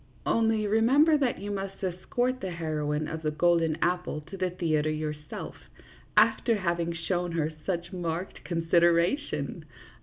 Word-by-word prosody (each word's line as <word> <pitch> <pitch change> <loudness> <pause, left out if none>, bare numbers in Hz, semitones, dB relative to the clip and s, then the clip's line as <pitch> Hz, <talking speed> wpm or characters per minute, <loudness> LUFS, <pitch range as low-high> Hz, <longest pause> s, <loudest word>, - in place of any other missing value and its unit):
"Only 225 -1 +2
remember 255 +9 +4
that 270 -5 +1
you 205 +1 -5
must 195 0 -5
escort 245 +8 -1
the 190 - -3
heroine 155 -3 -2
of 160 0 -5
the 155 - 0
golden 165 0 +2
apple 180 -3 0
to 160 +6 -10
the 185 -1 0
theatre 155 -4 0
yourself, 150 -1 -5 0.6
after 230 - +4
having 170 -3 -1
shown 175 +1 -2
her 160 -1 0 0.2
such 175 -1 -2
marked 175 0 -4
consideration. 170 - +1
175 Hz, 140 wpm, -28 LUFS, 160-195 Hz, 0.6 s, remember